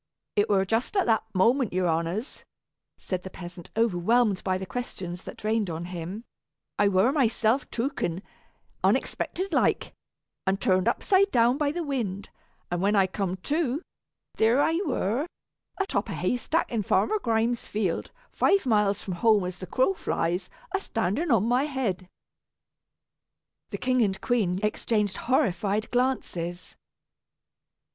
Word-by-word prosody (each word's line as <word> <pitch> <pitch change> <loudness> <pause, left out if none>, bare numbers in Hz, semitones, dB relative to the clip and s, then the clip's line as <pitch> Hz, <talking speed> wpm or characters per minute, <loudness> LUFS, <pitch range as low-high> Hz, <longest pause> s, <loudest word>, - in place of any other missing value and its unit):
"It 205 +2 +2
were 195 -2 +3
just 225 - 0
at 385 - +3
that 225 -2 +3
moment, 235 +5 +3
your 185 0 +1
honors," 170 - -2 0.5
said 185 -2 -4
the 190 - -8
peasant, 175 -2 -10
overwhelmed 220 0 +2
by 185 -1 +1
the 190 - -5
questions 190 -8 -5
that - - -9
rained 215 -2 +1
on 165 +1 -4
him, 180 +4 -6 0.6
"I 205 - +5
were 200 +5 +4
myself 240 -2 +1
tooken, 225 - -2 0.6
unexpected 375 0 0
like, - - +1 0.5
and 195 +1 +2
turned 185 -1 +2
upside 395 0 +3
down 240 -1 +3
by 295 -1 +2
the 340 +2 -3
wind; 225 - -3 0.4
and 175 0 -1
when 205 +2 +2
I 195 -2 +5
cum 190 -1 -2
to, 300 0 0 0.5
there 230 +4 +4
I 320 +3 +2
were 255 - 0 0.5
atop 390 - -1
a - - -3
haystack 250 +7 0
in 230 -3 0
Farmer 430 - +2
Grimes' 230 - 0
field, 200 -5 -1 0.2
five 395 -5 +3
miles 210 -4 +2
from 190 - -4
home 215 -4 +4
as 180 0 -5
the 185 - -7
crow 260 - +2
flies, 175 - -2 0.2
a 390 - +2
standing 230 - -1
on 225 -6 +4
my 250 +4 +2
head." 220 -11 -2 1.6
The - - -4
king 255 -1 +1
and 195 -3 +1
queen 195 -7 +1
exchanged 210 -1 0
horrified 215 - +1
glances. 180 -9 -2
215 Hz, 145 wpm, -27 LUFS, 185-255 Hz, 1.6 s, I